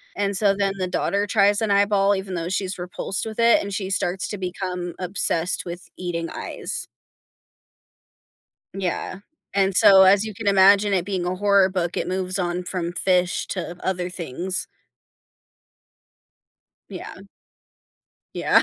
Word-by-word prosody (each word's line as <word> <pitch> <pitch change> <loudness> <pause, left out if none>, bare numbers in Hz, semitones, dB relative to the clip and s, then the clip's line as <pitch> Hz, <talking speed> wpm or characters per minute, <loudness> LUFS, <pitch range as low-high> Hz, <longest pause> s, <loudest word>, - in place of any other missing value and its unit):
and, 200 -1 -1
so, 200 -2 +3
then 195 -1 0
the 185 -1 -2
daughter 200 +3 0
tries 205 0 +3
an 220 - 0
eyeball 200 0 +3
even 190 -1 -5
though 170 +1 -3
she's 190 0 -2
repulsed 180 +3 -4
with 220 0 -7
it, 230 0 +5
and 200 -1 -5
she 190 -1 -3
starts 185 0 -1
to 205 - -5
become 180 -1 -4
obsessed 180 -2 0
with 175 +1 -7
eating 170 -2 -3
eyes. - - -5 1.9
Yeah, 185 0 -3 0.3
and 195 -1 +2
so, 195 -1 +8
as 195 +2 +5
you 215 -2 -6
can 210 - -7
imagine 200 +1 +5
it 185 -3 +1
being 185 -2 -2
a 180 +1 -1
horror 200 0 +4
book, 180 -2 -2
it - - -2
moves 185 0 -2
on 180 0 -2
from 175 -2 -3
fish 180 0 +1
to 175 -2 -4
other 180 -1 -1
things. 180 +2 -3 2.2
Yeah. - - -9 1.1
Yeah. - - +3
190 Hz, 145 wpm, -23 LUFS, 180-200 Hz, 2.2 s, so